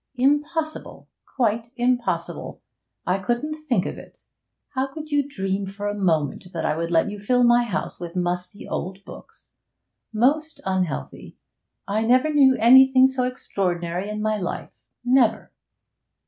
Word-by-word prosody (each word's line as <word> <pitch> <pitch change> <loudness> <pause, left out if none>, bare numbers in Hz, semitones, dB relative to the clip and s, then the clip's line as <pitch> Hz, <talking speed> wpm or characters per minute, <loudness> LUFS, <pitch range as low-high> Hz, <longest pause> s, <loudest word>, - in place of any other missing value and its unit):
'Impossible! 295 +5 -1 0.3
Quite 230 -2 0
impossible! 245 0 -1 0.5
I 185 +2 +1
couldn't 240 +9 -2
think 275 -11 -1
of - - -5
it! - - -15 0.5
How 270 -2 -1
could 310 +1 -8
you 290 0 +3
dream 195 -8 -3
for 200 +1 -5
a 205 - -1
moment 175 -3 -1
that 165 -2 -3
I 150 - +1
would 165 +1 -3
let 170 +4 +2
you 205 - -7
fill 245 +5 +2
my 240 0 +5
house 205 - -4
with 175 -1 -7
musty 180 +2 -3
old 195 +2 -5
books? - - -14 0.6
Most 290 +8 +1
unhealthy! 185 -6 -3 0.5
I 210 +2 0
never 255 +6 +3
knew 270 -3 +5
anything 260 +2 +7
so 260 -1 +1
extraordinary 180 -6 -3
in 210 0 -4
my 215 0 +1
life, 180 -4 -6 0.2
never!' 245 -3 +2
225 Hz, 145 wpm, -23 LUFS, 190-265 Hz, 0.6 s, anything